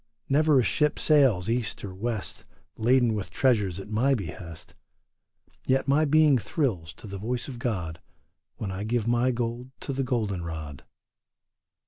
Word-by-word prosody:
Never 150 0 +4
a - - +3
ship 150 +5 +1
sails 135 - +3
east 115 -1 -2
or 95 - -7
west 110 +2 -4 0.3
Laden 120 0 +3
with 100 -4 -3
treasures 100 -4 +1
at 95 - -8
my 130 +6 +3
behest, 85 -5 -8 0.9
Yet 135 +1 +2
my 145 +3 +4
being 150 -2 +5
thrills 95 - -2
to - - -13
the 100 -1 -6
voice 120 +4 -3
of 125 -4 -7
God 90 - -3 0.5
When 100 -3 -4
I 95 +2 -4
give 115 0 0
my 120 +2 +2
gold 120 +1 -3
to 140 - -3
the 135 +1 -1
golden 110 -8 -1
rod. 80 -4 -7
115 Hz, 155 wpm, -27 LUFS, 95-130 Hz, 0.9 s, being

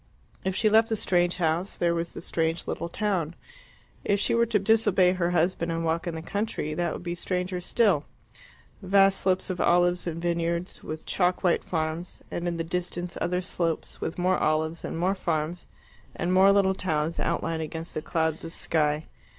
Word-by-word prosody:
If 190 0 -1
she 215 - +2
left 220 +1 +5
the 220 - +1
strange 175 -3 +2
house 170 +2 0
there 170 -1 +2
was 170 0 -3
the - - -6
strange 165 0 -1
little 170 - -3
town. 180 -5 -1 0.7
If 205 0 +1
she - - +1
were 235 0 +3
to 220 -1 +2
disobey 195 -3 +3
her 180 -2 0
husband 175 0 +1
and 165 0 -2
walk 165 +2 0
in 170 - -3
the 160 - -6
country, 200 -5 -2
that 170 +1 -1
would - - -6
be 175 -1 -3
stranger 180 +1 -2
still 190 -5 +2 0.8
vast 195 0 +4
slopes 185 0 +1
of 180 - -3
olives 175 0 +3
and 165 -1 -3
vineyards, 170 +1 -1
with 155 0 -6
chalk 180 -1 +1
white 175 -2 +2
farms, 160 +1 -3
and 175 0 -3
in 170 -1 -1
the 165 - -1
distance 175 +1 -3
other 180 +1 0
slopes, 170 -2 -2
with 160 - -3
more 180 +1 +2
olives 160 +2 0
and - - -4
more 180 +3 +2
farms, 170 -2 -2 0.5
and 180 +1 -1
more 190 +1 +7
little 195 -1 +4
towns 160 -3 -1
outlined 165 -1 -1
against 160 +1 -5
the 155 - -3
cloudless 160 +1 -2
sky. 150 -1 0
175 Hz, 185 wpm, -27 LUFS, 165-185 Hz, 0.8 s, more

